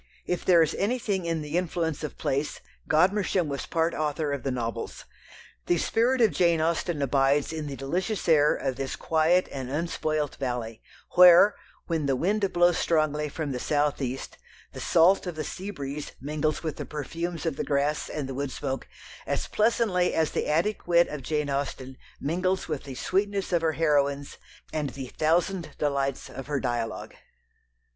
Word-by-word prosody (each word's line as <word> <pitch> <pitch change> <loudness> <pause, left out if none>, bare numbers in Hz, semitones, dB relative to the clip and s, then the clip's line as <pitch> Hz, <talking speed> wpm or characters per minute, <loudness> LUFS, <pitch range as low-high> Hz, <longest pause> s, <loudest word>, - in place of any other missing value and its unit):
If 180 - -2
there 170 -3 +6
is 160 - -1
anything 205 -4 0
in 165 -2 -1
the 150 +4 0
influence 165 -3 -2
of 150 - -5
place, 140 +3 -1 0.3
Godmersham 185 +1 +2
was 140 -2 -4
part 165 0 +1
author 150 -1 -1
of 140 - -3
the 135 - -2
novels. 115 -3 -4 0.6
The 175 - +3
spirit 240 +8 +2
of 220 -4 +5
Jane 170 -2 +3
Austen 160 -1 0
abides 140 +2 +2
in 155 -2 -4
the 140 - -5
delicious 180 +10 -2
air 150 -3 +5
of 130 -1 -3
this 135 -1 -3
quiet 165 +3 +2
and 130 -2 -5
unspoilt 155 -1 -2
valley, 120 -4 -4 0.3
where, 180 +3 +8 0.3
when 160 -4 -1
the 135 - +2
wind 195 +7 0
blows 175 -1 +3
strongly 150 -2 +1
from 150 0 -4
the 125 - -3
south 145 +1 0
east, 130 0 -4 0.3
the - - -7
salt 180 +3 +4
of 175 - -4
the 155 - -3
sea 190 +2 -6
breeze 145 -5 -6
mingles 150 +2 -2
with 155 -2 -3
the - - -5
perfumes 165 +3 -4
of 160 -4 0
the - - -2
grass 145 +1 0
and 145 -3 -4
the 135 - -5
wood 140 +1 -2
smoke 135 0 -4 0.4
as - - -1
pleasantly 210 -5 +1
as 160 -1 +1
the - - -1
Attic 175 +8 0
wit 170 0 +4
of 150 - -5
Jane 150 +2 -1
Austen 135 -1 -3 0.2
mingles 185 +5 -1
with 150 -4 -4
the 135 -2 -7
sweetness 195 +5 -1
of 170 - +3
her 160 -1 +1
heroines 145 -3 +1 0.4
and 150 -3 -1
the 130 -1 -7
thousand 170 +3 0
delights 140 -2 -1
of 135 - -8
her 145 -1 -1
dialogue. 120 -3 -3
155 Hz, 175 wpm, -27 LUFS, 140-175 Hz, 0.6 s, where